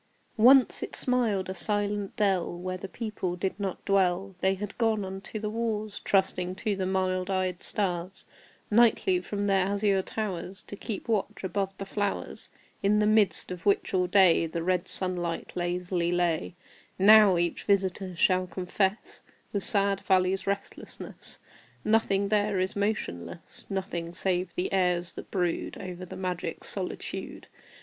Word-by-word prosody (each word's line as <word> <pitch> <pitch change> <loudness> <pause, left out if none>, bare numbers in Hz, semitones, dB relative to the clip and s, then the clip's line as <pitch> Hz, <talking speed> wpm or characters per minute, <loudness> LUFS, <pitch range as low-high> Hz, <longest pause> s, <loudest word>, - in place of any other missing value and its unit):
Once 255 +3 +6
it - - -4
smiled 230 -7 +1
a 190 - -3
silent 205 0 0
dell 190 -5 +1
Where 185 +1 -4
the 185 +1 -6
people 210 -6 -3
did 190 +2 -3
not 195 -2 -4
dwell; 195 -1 +2
They 190 0 +3
had 205 +1 -6
gone 220 -3 +1
unto 190 +3 -6
the 215 0 -3
wars, 215 -2 -2
Trusting 185 -2 +1
to 205 +2 -1
the 190 -1 -2
mild 185 0 0
eyed 185 -2 -1
stars, 185 -1 -2 0.5
Nightly, 210 -5 +4
from 205 +2 -3
their 195 -2 +3
azure 200 -1 +2
towers, 190 -2 -4
To - - -7
keep 205 0 -6
watch 215 -4 -1
above 195 0 -2
the 195 - -5
flowers, 205 +1 -3 0.3
In 205 +1 +3
the 210 - +3
midst 215 -3 +3
of 180 -2 -6
which 200 - +1
all 180 -1 +2
day 180 -4 +5
The 165 +1 -4
red 180 +1 0
sun 185 -1 0
light 170 -1 -3
lazily 175 0 -1
lay, 175 -1 0 0.4
Now 205 -1 +7
each 170 0 -1
visitor 190 -2 0
shall 185 +1 +2
confess 190 +3 -2 0.3
The 200 - -1
sad 200 -2 +3
valley's 185 0 +2
restlessness. 200 0 -4 0.5
Nothing 200 -2 +2
there 205 -2 +1
is 185 +2 -1
motionless 145 - -4
Nothing 175 -3 -4
save 180 -1 0
the 180 - -2
airs 180 -2 +1
that - - -9
brood 175 -3 -1
Over 185 -1 -7
the - - -9
magic 180 -2 -4
solitude. - - -3
190 Hz, 155 wpm, -28 LUFS, 180-205 Hz, 0.5 s, Now